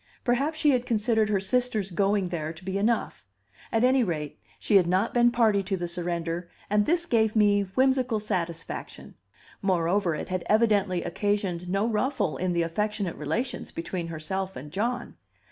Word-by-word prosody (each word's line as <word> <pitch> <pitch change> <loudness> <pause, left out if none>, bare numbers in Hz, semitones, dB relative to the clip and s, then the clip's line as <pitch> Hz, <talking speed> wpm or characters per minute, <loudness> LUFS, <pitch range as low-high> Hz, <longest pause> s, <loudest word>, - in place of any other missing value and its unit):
Perhaps 275 +6 +1
she 300 -2 +4
had 250 -1 0
considered 220 -1 +2
her 205 -2 +2
sister's 220 -1 0
going 195 0 +1
there 160 -3 -3
to 165 +3 -13
be 190 0 -3
enough; 225 +3 0 0.5
at 225 +1 +2
any 255 0 +4
rate, 155 -7 -3 0.2
she 205 - +3
had 180 -3 +3
not 185 +5 +1
been 240 0 +5
party 225 -4 +3
to 195 0 -2
the 175 -1 -3
surrender, 170 0 -3 0.2
and 210 0 +3
this 340 +1 +2
gave 220 -7 +2
me 205 -1 +4
whimsical 260 -3 +2
satisfaction. 175 -6 -4 0.5
Moreover, 180 -2 +1
it - - -5
had 185 -1 -1
evidently 205 -5 +3
occasioned 185 -2 -1
no 195 +4 +1
ruffle 235 - 0
in 185 0 -1
the 170 -1 +1
affectionate 205 +2 -2
relations 250 +2 -3
between 170 +1 -4
herself 190 +4 -4
and 145 +3 -8
John. 235 +7 -2
200 Hz, 165 wpm, -27 LUFS, 175-230 Hz, 0.5 s, been